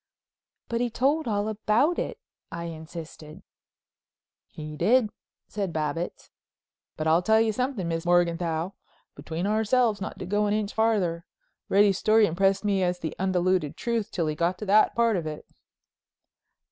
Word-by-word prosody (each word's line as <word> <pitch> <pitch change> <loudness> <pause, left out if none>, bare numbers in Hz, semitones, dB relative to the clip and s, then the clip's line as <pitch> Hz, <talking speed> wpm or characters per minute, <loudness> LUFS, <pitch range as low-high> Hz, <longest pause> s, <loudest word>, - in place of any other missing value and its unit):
"But 235 0 -2
he 245 - 0
told 280 +5 +1
all 205 -1 0
about 220 +9 +1
it," - - -3 0.3
I 170 +1 -5
insisted. 160 -1 -9 1.0
"He 150 0 -8
did," 225 +5 +3 0.4
said 200 -4 -3
Babbitts, 155 +2 -4 0.7
"but 155 - -3
I'll 160 +2 +4
tell 220 +4 +3
you 225 -1 +2
something, 250 -6 -2
Miss 165 0 -2
Morganthau—between 170 -1 -2
ourselves 220 +1 +2
not - - -5
to 185 - -6
go 210 +3 +1
an 205 - +1
inch 210 -1 -2
farther—Reddy's 200 -1 0
story 220 0 +4
impressed 195 +3 +1
me 200 -2 +1
as 180 -1 0
the 160 -3 -5
undiluted 185 -4 0
truth 235 -3 -2
till 170 -3 -2
he 155 - -1
got 170 +4 0
to 210 - -6
that 210 +2 +4
part 230 -3 +2
of 165 -3 -3
it." 150 -1 -7
195 Hz, 145 wpm, -26 LUFS, 170-220 Hz, 1.0 s, I'll